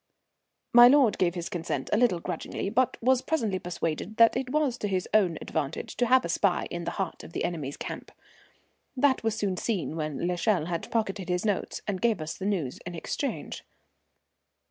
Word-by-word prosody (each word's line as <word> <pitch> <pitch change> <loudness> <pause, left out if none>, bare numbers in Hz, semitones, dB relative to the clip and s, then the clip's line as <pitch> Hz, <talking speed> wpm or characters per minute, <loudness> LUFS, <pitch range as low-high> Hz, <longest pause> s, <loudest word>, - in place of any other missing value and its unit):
My 240 0 +10
lord 265 -4 +4
gave 180 -1 +2
his 175 -1 -4
consent 175 -1 -4
a - - +4
little 225 -7 +3
grudgingly, 195 - -4
but 250 +2 +2
was 260 +1 +4
presently 225 -13 -1
persuaded 175 +3 -4
that 230 0 +6
it 260 -1 -2
was 290 -3 0
to 210 - -1
his 185 -2 -1
own 190 -6 +3
advantage 155 -1 -4
to 245 - +2
have 255 +1 +4
a - - -4
spy 185 -4 +1
in 170 -1 -4
the 170 - -2
heart 190 -4 -3
of 165 - -11
the - - -2
enemy's 150 -5 -3
camp. - - -7 0.9
That 265 0 +3
was 225 -1 0
soon 195 -4 -1
seen 190 -8 -2
when 155 0 -3
l'Echelle 180 -1 +1
had 170 -1 -4
pocketed 195 -5 -1
his 180 +3 0
notes 205 -3 -2
and 195 -3 -2
gave 230 -5 +2
us 155 0 -5
the 190 - -4
news 170 -11 -2
in 175 0 -7
exchange. 270 - -4
195 Hz, 190 wpm, -28 LUFS, 170-235 Hz, 0.9 s, My